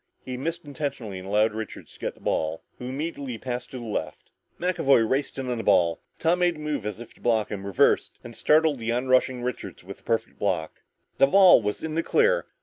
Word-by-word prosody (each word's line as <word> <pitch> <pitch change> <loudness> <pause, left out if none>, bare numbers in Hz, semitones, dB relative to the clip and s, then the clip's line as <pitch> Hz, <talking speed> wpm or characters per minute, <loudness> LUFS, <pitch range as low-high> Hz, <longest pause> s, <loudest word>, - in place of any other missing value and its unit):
He 130 - -4
missed 165 +6 -4
intentionally 140 -9 -4
and 95 - -9
allowed 105 +2 +2
Richards 110 0 -7
to - - -18
get - - -3
the - - -22
ball, 80 +1 -1 0.2
who 125 - -7
immediately 140 -2 -4
passed 125 +1 -5
to 130 - -7
the 120 - -7
left. 110 - -5 0.3
McAvoy 140 -10 +3
raced 135 +4 -1
in 135 -1 -4
on 125 -2 -2
the - - -3
ball, 85 -1 +3 0.2
Tom 170 +2 +2
made 175 -1 +2
a - - -11
move 150 -8 -3
as 105 0 -5
if 120 -1 -10
to - - -24
block 110 -3 +1
him, 100 -1 -5
reversed, 100 - +2
and 120 -1 -9
startled 155 -2 +3
the 115 0 -2
onrushing 130 0 +2
Richards 110 -9 -5
with 95 +2 -10
a - - -30
perfect 115 -1 -2
block. 90 -6 -2 0.4
The 135 - +7
ball 190 -2 +7
was 105 -1 -3
in 160 -1 -3
the 165 - +1
clear. 480 - +2
125 Hz, 225 wpm, -26 LUFS, 110-150 Hz, 0.4 s, The